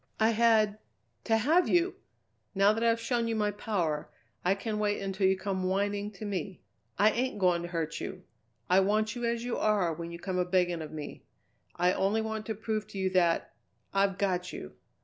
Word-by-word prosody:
"I 220 Hz, +1 st, +4 dB
had 220 Hz, -2 st, +3 dB, 0.5 s
to 225 Hz, -, +3 dB
have 315 Hz, +11 st, +3 dB
you! 350 Hz, +1 st, +3 dB, 0.6 s
Now 200 Hz, +2 st, +5 dB
that 225 Hz, +1 st, -2 dB
I've 230 Hz, 0 st, +3 dB
shown 235 Hz, 0 st, 0 dB
you 225 Hz, -, -1 dB
my 210 Hz, -1 st, +1 dB
power, 180 Hz, -8 st, -2 dB, 0.3 s
I 185 Hz, +2 st, +3 dB
can 210 Hz, +1 st, -3 dB
wait 205 Hz, -1 st, +1 dB
until 195 Hz, 0 st, 0 dB
you 190 Hz, 0 st, +3 dB
come 190 Hz, 0 st, -2 dB
whining 200 Hz, +2 st, 0 dB
to 215 Hz, -, -8 dB
me. 195 Hz, -2 st, -4 dB, 0.3 s
I 210 Hz, +2 st, +5 dB
ain't 250 Hz, 0 st, -1 dB
going 180 Hz, -3 st, +2 dB
to 175 Hz, -, -5 dB
hurt 165 Hz, -2 st, -3 dB
you! 185 Hz, -1 st, -6 dB, 0.4 s
I 185 Hz, +1 st, +5 dB
want 215 Hz, +3 st, +1 dB
you 240 Hz, -1 st, -3 dB
as 235 Hz, 0 st, -1 dB
you 245 Hz, -1 st, -2 dB
are 200 Hz, -6 st, +2 dB
when 170 Hz, +1 st, -6 dB
you 170 Hz, -, -6 dB
come 185 Hz, +1 st, -3 dB
a 180 Hz, -, +2 dB
begging 180 Hz, -2 st, +1 dB
of 155 Hz, -, -7 dB
me. 155 Hz, -2 st, -7 dB, 0.5 s
I 180 Hz, +1 st, +3 dB
only 200 Hz, +3 st, +1 dB
wanted 220 Hz, -1 st, -4 dB
to 220 Hz, -, -2 dB
prove 215 Hz, 0 st, -3 dB
to -, -, -9 dB
you 190 Hz, -1 st, 0 dB
that 175 Hz, -3 st, +2 dB, 0.4 s
I've 195 Hz, -1 st, +2 dB
got 185 Hz, -2 st, -1 dB
you!" 75 Hz, -, -8 dB
200 Hz, 205 wpm, -30 LUFS, 185-220 Hz, 0.6 s, Now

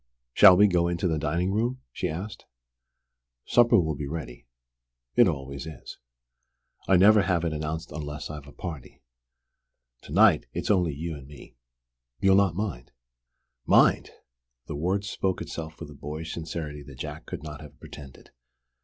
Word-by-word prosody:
"Shall 95 Hz, -3 st, +8 dB
we 105 Hz, -, +7 dB
go 90 Hz, -3 st, +2 dB
into 85 Hz, +1 st, -1 dB
the 80 Hz, -2 st, 0 dB
dining 85 Hz, +5 st, -1 dB
room?" 120 Hz, +5 st, -1 dB
she 90 Hz, -, -3 dB
asked. 95 Hz, +7 st, -7 dB, 1.0 s
"Supper 120 Hz, -3 st, +5 dB
will 80 Hz, -3 st, 0 dB
be 70 Hz, 0 st, -5 dB
ready. 60 Hz, -6 st, -7 dB, 0.7 s
It -, -, +6 dB
always 70 Hz, +2 st, -4 dB
is. 80 Hz, -, -10 dB, 0.9 s
I 95 Hz, -, +5 dB
never 105 Hz, +3 st, +6 dB
have 85 Hz, -3 st, 0 dB
it 80 Hz, -, -1 dB
announced 75 Hz, +1 st, -4 dB
unless 75 Hz, -1 st, -6 dB
I've 75 Hz, -2 st, -9 dB
a -, -, -12 dB
party. 80 Hz, -9 st, -8 dB, 1.0 s
To -, -, -13 dB
night -, -, +5 dB
it's -, -, -1 dB
only 90 Hz, -7 st, +2 dB
you 80 Hz, +3 st, -4 dB
and 70 Hz, -2 st, -11 dB
me. 70 Hz, -3 st, -14 dB, 0.6 s
You'll 95 Hz, +4 st, +4 dB
not 95 Hz, -4 st, +3 dB
mind?" 90 Hz, -, -4 dB, 0.8 s
"Mind!" -, -, +4 dB, 0.6 s
The -, -, -6 dB
word 95 Hz, +7 st, -1 dB
spoke 95 Hz, -2 st, -2 dB
itself 80 Hz, -1 st, -7 dB
with 75 Hz, -3 st, -8 dB
a -, -, -10 dB
boyish 75 Hz, +3 st, -6 dB
sincerity 80 Hz, -2 st, -5 dB
that 70 Hz, -2 st, -12 dB
Jack 75 Hz, +3 st, -7 dB
could -, -, -7 dB
not 75 Hz, -1 st, -8 dB
have 75 Hz, -2 st, -13 dB
pretended. 70 Hz, -3 st, -12 dB
80 Hz, 160 wpm, -26 LUFS, 75-90 Hz, 1.0 s, Shall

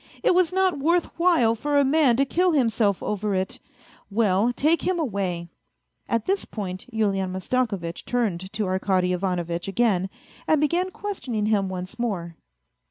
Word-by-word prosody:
It -, -, +4 dB
was 360 Hz, -1 st, +3 dB
not 375 Hz, -4 st, +1 dB
worth 335 Hz, +4 st, +1 dB
while 330 Hz, -11 st, +4 dB
for 290 Hz, +6 st, -1 dB
a 285 Hz, -, +4 dB
man 270 Hz, -4 st, +3 dB
to 275 Hz, -, +3 dB
kill 355 Hz, +5 st, +2 dB
himself 225 Hz, -7 st, +1 dB
over 210 Hz, -1 st, -1 dB
it! 190 Hz, 0 st, -2 dB, 0.5 s
Well, 210 Hz, +1 st, +2 dB
take 310 Hz, +7 st, +2 dB
him 370 Hz, -1 st, 0 dB
away! 195 Hz, -, -2 dB, 0.3 s
".. -, -, -41 dB
.At 230 Hz, -2 st, 0 dB
this 390 Hz, +1 st, 0 dB
point 185 Hz, -2 st, -6 dB
Yulian 195 Hz, -4 st, 0 dB
Mastakovitch 190 Hz, -3 st, -2 dB
turned 195 Hz, -7 st, -2 dB
to 215 Hz, -1 st, -1 dB
Arkady 185 Hz, -1 st, +1 dB
Ivanovitch 175 Hz, -2 st, -2 dB
again, 195 Hz, -3 st, +1 dB, 0.4 s
and 315 Hz, -, +4 dB
began 340 Hz, +5 st, +1 dB
questioning 275 Hz, -, -4 dB
him 205 Hz, -3 st, +1 dB
once 185 Hz, +3 st, -6 dB
more. 180 Hz, -8 st, -3 dB
220 Hz, 160 wpm, -24 LUFS, 190-290 Hz, 0.5 s, It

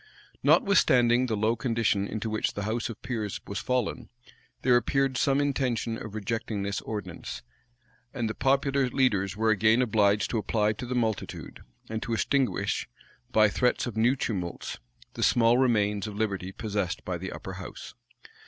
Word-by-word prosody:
Notwithstanding 125 Hz, -10 st, +4 dB
the 110 Hz, -3 st, -1 dB
low 110 Hz, +3 st, +2 dB
condition 115 Hz, -4 st, 0 dB
into 110 Hz, +1 st, -4 dB
which 110 Hz, 0 st, -1 dB
the 100 Hz, -, -3 dB
house 115 Hz, +3 st, -2 dB
of 115 Hz, -, -7 dB
peers 110 Hz, -5 st, -3 dB
was 100 Hz, -, -4 dB
fallen, 125 Hz, -4 st, -2 dB, 0.5 s
there 125 Hz, -1 st, +5 dB
appeared 135 Hz, +2 st, +1 dB
some 135 Hz, +2 st, +2 dB
intention 130 Hz, -5 st, 0 dB
of 110 Hz, -2 st, -8 dB
rejecting 110 Hz, 0 st, -3 dB
this 100 Hz, 0 st, -2 dB
ordinance; 90 Hz, -, -6 dB, 0.7 s
and 120 Hz, -4 st, -2 dB
the 110 Hz, -, -2 dB
popular 135 Hz, 0 st, +1 dB
leaders 105 Hz, -7 st, +1 dB
were 110 Hz, 0 st, +3 dB
again 110 Hz, +2 st, +4 dB
obliged 105 Hz, -4 st, +2 dB
to 115 Hz, -, +1 dB
apply 105 Hz, +1 st, +1 dB
to 120 Hz, +3 st, -7 dB
the 125 Hz, -, -2 dB
multitude, 110 Hz, -4 st, -3 dB, 0.3 s
and 110 Hz, 0 st, -4 dB
to 115 Hz, -, -3 dB
extinguish, 135 Hz, -, 0 dB, 0.4 s
by 110 Hz, -1 st, +5 dB
threats 125 Hz, +4 st, +1 dB
of 120 Hz, -4 st, -5 dB
new 120 Hz, +4 st, +3 dB
tumults, 90 Hz, -9 st, -4 dB, 0.3 s
the -, -, -6 dB
small 120 Hz, +1 st, +4 dB
remains 105 Hz, -5 st, +2 dB
of 105 Hz, -, -7 dB
liberty 100 Hz, -3 st, -2 dB
possessed 100 Hz, -3 st, -3 dB
by 90 Hz, -2 st, -3 dB
the 95 Hz, +2 st, -5 dB
upper -, -, -7 dB
house. -, -, -9 dB
110 Hz, 160 wpm, -28 LUFS, 105-125 Hz, 0.7 s, there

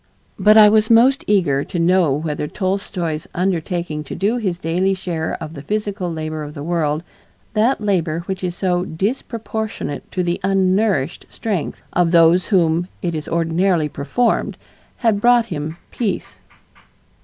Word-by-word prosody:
But 210 Hz, +3 st, +6 dB
I 215 Hz, -1 st, +9 dB
was 215 Hz, +1 st, +3 dB
most 245 Hz, +4 st, +5 dB
eager 170 Hz, -9 st, +2 dB
to 185 Hz, -, -5 dB
know 175 Hz, -2 st, +3 dB
whether 150 Hz, +1 st, -2 dB
Tolstoy's 185 Hz, -4 st, -3 dB
undertaking 175 Hz, -3 st, -1 dB
to -, -, -6 dB
do 210 Hz, +5 st, 0 dB
his 190 Hz, -7 st, -2 dB
daily 180 Hz, +3 st, 0 dB
share 170 Hz, -4 st, -3 dB
of 155 Hz, -, -7 dB
the 140 Hz, -, -8 dB
physical 205 Hz, -1 st, -2 dB
labor 155 Hz, -1 st, -4 dB
of 150 Hz, 0 st, -7 dB
the 145 Hz, -, -6 dB
world, 160 Hz, -2 st, -1 dB, 0.5 s
that 230 Hz, +5 st, +2 dB
labor 175 Hz, -6 st, 0 dB
which 190 Hz, +2 st, -5 dB
is 175 Hz, -1 st, -2 dB
"so 180 Hz, -2 st, 0 dB
disproportionate 220 Hz, -, -4 dB
to 180 Hz, -, -1 dB
the 175 Hz, 0 st, -1 dB
unnourished 190 Hz, -4 st, +1 dB
strength" 200 Hz, -9 st, -3 dB
of 175 Hz, -1 st, +3 dB
those 170 Hz, +1 st, +5 dB
by 195 Hz, -, +3 dB
whom 170 Hz, 0 st, +1 dB, 0.2 s
it 175 Hz, -2 st, -1 dB
is 155 Hz, -2 st, -4 dB
ordinarily 165 Hz, 0 st, +1 dB
performed, 225 Hz, -, 0 dB, 0.4 s
had 220 Hz, -4 st, +1 dB
brought 240 Hz, 0 st, +5 dB
him 155 Hz, +2 st, -5 dB
peace! 225 Hz, -5 st, -3 dB
180 Hz, 155 wpm, -20 LUFS, 160-205 Hz, 0.5 s, I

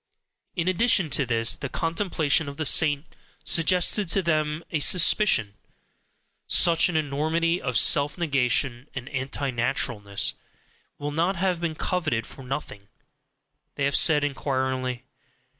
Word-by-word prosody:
In 170 Hz, -2 st, -2 dB
addition 185 Hz, -4 st, +2 dB
to 140 Hz, -, +1 dB
this, 115 Hz, -1 st, +2 dB
the 140 Hz, -, -6 dB
contemplation 165 Hz, -2 st, -1 dB
of 140 Hz, -, -10 dB
the 155 Hz, -, -2 dB
saint 145 Hz, +1 st, +2 dB, 0.4 s
suggested 180 Hz, +4 st, +2 dB
to 190 Hz, +3 st, +2 dB
them 155 Hz, -1 st, -1 dB
a 160 Hz, -, 0 dB
suspicion: 165 Hz, -, +3 dB, 0.9 s
such 170 Hz, 0 st, +4 dB
an 170 Hz, -, -1 dB
enormity 160 Hz, +4 st, -1 dB
of 125 Hz, -3 st, -1 dB
self 140 Hz, 0 st, +3 dB
negation 135 Hz, -4 st, -1 dB
and 130 Hz, -2 st, -6 dB
anti 135 Hz, 0 st, -3 dB
naturalness 115 Hz, -4 st, -1 dB, 0.6 s
will 145 Hz, 0 st, -5 dB
not 170 Hz, +6 st, 0 dB
have 180 Hz, -1 st, -1 dB
been 165 Hz, -2 st, -2 dB
coveted 155 Hz, -, -2 dB
for -, -, -13 dB
nothing 125 Hz, -6 st, -7 dB, 0.9 s
they 145 Hz, -, -3 dB
have 140 Hz, +1 st, +1 dB
said, 150 Hz, -3 st, +4 dB
inquiringly. 130 Hz, -3 st, -2 dB
145 Hz, 130 wpm, -25 LUFS, 130-170 Hz, 0.9 s, such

